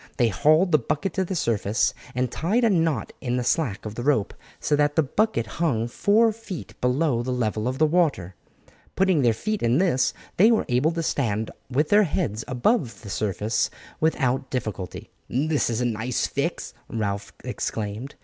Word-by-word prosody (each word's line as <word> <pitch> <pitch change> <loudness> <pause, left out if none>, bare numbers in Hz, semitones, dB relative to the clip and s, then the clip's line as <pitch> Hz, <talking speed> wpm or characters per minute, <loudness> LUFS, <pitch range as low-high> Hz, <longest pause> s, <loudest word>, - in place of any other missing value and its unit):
They 120 -3 +3
hauled 155 - +3
the 155 - +5
bucket 155 +8 -2
to 190 - 0
the 190 +1 -4
surface 110 - +1 0.2
and 125 -1 0
tied 205 - 0
a 230 - +4
knot 160 - 0
in 125 0 -1
the 125 - -1
slack 120 -7 0
of 105 - -5
the 120 - -5
rope, 130 -6 +1 0.3
so 150 - +1
that 145 0 +2
the 160 - +4
bucket 200 - 0 0.2
hung 120 -9 +1
four 215 - +3
feet 215 -5 -8
below 125 0 +1
the 125 - -4
level 110 -2 -1
of 130 +1 -2
the 155 - +4
water. 150 - +1 0.6
Putting 185 -5 +3
their 120 -3 +4
feet 215 - -2
in 120 +2 +3
this, 165 -8 +2 0.3
they 210 +5 +7
were 225 -2 +2
able 125 +5 +3
to 165 0 -2
stand 110 -8 -1 0.2
with 145 +4 +1
their 205 +1 +6
heads 140 - -2
above 130 - 0
the 100 - -7
surface 105 +2 0 0.3
without 135 -4 +1
difficulty. 110 -7 -5 0.2
"This 150 +3 +1
is 115 +1 -1
a - - +1
nice 120 +1 -1
fix," - - -3 0.2
Ralph 100 -3 -3
exclaimed. 110 +5 -4
130 Hz, 180 wpm, -24 LUFS, 115-165 Hz, 0.6 s, they